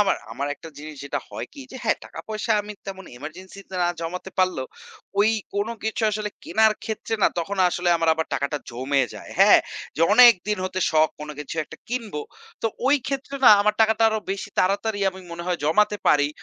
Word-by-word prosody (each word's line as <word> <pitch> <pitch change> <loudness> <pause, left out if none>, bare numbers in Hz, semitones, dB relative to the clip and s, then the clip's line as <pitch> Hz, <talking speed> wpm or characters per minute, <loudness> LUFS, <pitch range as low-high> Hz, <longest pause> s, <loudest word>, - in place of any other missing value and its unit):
আমার 200 -2 +3 0.2
আমার 140 +1 -3
একটা 165 - -12
জিনিস 155 0 -9
যেটা 140 - -2
হয় - - -5
কি, 280 - -10
যে 260 - -8
হ্যাঁ, - - +2
টাকা - - -9
পয়সা 220 +1 -1
আমি 210 +1 -7
তেমন 190 -1 -7
এমার্জেন্সি 180 +8 -9
তে - - -8
না 175 - +2
জমাতে 180 +3 -5
পারলেও, 185 -8 +1 0.5
ওই 215 +2 +5 0.2
কোন 205 +2 0 0.2
কিছু 220 +1 -2
আসলে 210 0 -3
কেনার 220 0 +4
ক্ষেত্রে 225 0 -3
না, - - +7
তখন 195 +4 -3
আসলে 175 0 -1
আমার 165 0 0
আবার 160 0 -2
টাকাটা 140 +2 -1
জমে 135 +3 0
যায়। - - -10
হ্যাঁ? - - +8 0.4
যে - - -4
অনেকদিন 210 -3 +6
হতে 185 0 -3
শখ 155 0 +4
কোন 150 - -6
কিছু 150 +1 -6
একটা - - -12
কিনবো। 225 -10 -3 0.4
তো - - +2 0.2
ওই 285 +2 +5
ক্ষেত্রে 275 0 -4
না - - +10
আমার 210 0 +2
টাকাটা 220 0 +4
আরও 220 0 -1
বেশি 195 0 -3
তাড়াতাড়ি 205 +3 0
আমি 190 0 -11
মনে 170 0 -6
হয় 180 -1 0
জমাতে 210 +7 +3
পারি। 145 -1 +4
190 Hz, 200 wpm, -24 LUFS, 160-215 Hz, 0.5 s, না